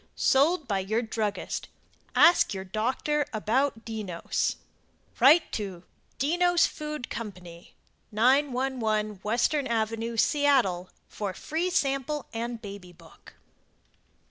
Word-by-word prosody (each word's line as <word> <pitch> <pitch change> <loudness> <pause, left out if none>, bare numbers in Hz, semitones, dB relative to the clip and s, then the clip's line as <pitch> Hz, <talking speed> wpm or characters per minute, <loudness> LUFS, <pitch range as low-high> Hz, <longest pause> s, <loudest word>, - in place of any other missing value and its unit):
SOLD 295 +3 +3
BY 200 -3 0
YOUR 215 +5 -1
DRUGGIST 215 -2 -3 0.5
Ask 335 - +5
your 190 - -4
doctor 250 +9 -1
about 225 +3 0
"Dennos" 210 -7 -2 0.6
Write 300 +7 +6
to 190 -5 -5 0.3
DENNOS 350 +5 +3
FOOD 300 -4 -5
CO. 225 -3 -4 0.8
911 245 -2 +1
Western 245 +7 +1
Ave., 225 +1 -1
Seattle 245 -11 +2 0.2
for 200 -3 -5
Free 335 +4 -2
Sample 280 -4 -1
and 235 +1 -4
Baby 200 -4 -9
Book. 165 -2 -18
235 Hz, 100 wpm, -27 LUFS, 210-285 Hz, 0.8 s, Write